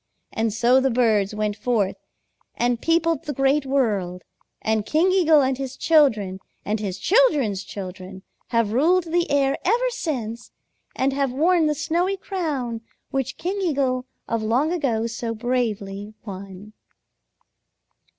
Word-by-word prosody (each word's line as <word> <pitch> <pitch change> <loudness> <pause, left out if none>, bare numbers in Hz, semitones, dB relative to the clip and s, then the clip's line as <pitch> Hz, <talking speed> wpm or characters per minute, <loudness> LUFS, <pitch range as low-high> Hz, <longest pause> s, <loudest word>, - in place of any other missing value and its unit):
And 225 0 0
so 240 +4 +4
the 270 - +2
birds 220 -5 +2
went 210 -1 -1
forth 220 -5 0 0.6
and 240 0 0
peopled 330 -1 +1
the 295 - -3
Great 270 +1 +2
World, 205 -10 0 0.4
and 220 -1 0
King 320 - +2
Eagle 325 -6 +5
and 265 0 0
his 270 -1 -5
children 220 - +3 0.3
and 210 +1 -1
his 200 -3 -4
children's 280 - +2
children 190 -1 -8 0.2
have 230 -3 +1
ruled 340 +9 +3
the 345 0 +1
air 275 -1 +2
ever 485 +6 +2
since 240 - -4 0.5
and 270 +1 +1
have 275 -2 0
worn 325 +4 +3
the 300 - +1
snowy 350 +6 0
crown 290 - -3 0.3
which 270 -1 -2
King 385 +4 -3
Eagle 270 -7 0 0.2
of 230 -1 -1
long 250 +10 +1
ago 240 -10 0
so 230 0 -4
bravely 215 -4 -2
won." 195 +1 -9
250 Hz, 140 wpm, -23 LUFS, 215-310 Hz, 0.6 s, Eagle